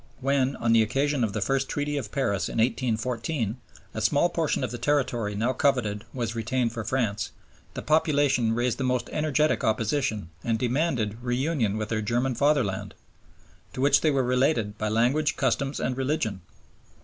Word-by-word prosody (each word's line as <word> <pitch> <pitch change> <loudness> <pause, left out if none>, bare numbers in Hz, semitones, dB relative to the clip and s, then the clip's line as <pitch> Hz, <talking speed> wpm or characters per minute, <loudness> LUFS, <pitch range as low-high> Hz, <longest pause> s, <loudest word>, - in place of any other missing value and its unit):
When, 135 0 +1
on 115 -1 +1
the 115 - +6
occasion 135 +4 +1
of 105 -3 -1
the 105 - -2
first 135 +5 0
Treaty 145 0 -2
of 125 -8 -4
Paris 100 -9 0
in - - -5
1814, 115 0 -1 0.4
a 110 - -4
small 150 +8 +3
portion 160 -5 -1
of 125 - -2
the 120 - -5
territory 120 -5 0
now 115 +5 0
coveted 120 -7 0
was 120 -3 -3
retained 115 +1 -1
for 115 -2 -4
France, 110 -5 -1 0.5
the - - -5
population 145 -7 +2
raised 120 +2 0
the - - -1
most 125 -1 -1
energetic 150 -4 +1
opposition 110 - 0
and 115 -1 0
demanded 125 -3 -1
'reunion 125 -3 0
with 110 -1 -3
their 110 -2 -1
German 120 +4 0
fatherland,' 130 -8 0 0.8
to 130 - -4
which 140 +2 +4
they 155 - +3
were 135 -3 +2
'related 125 -4 +1
by 110 - -1
language, 130 +7 +1
customs, 135 +1 0
and 125 - -1
religion.' 130 -7 -1
125 Hz, 170 wpm, -26 LUFS, 110-140 Hz, 0.8 s, the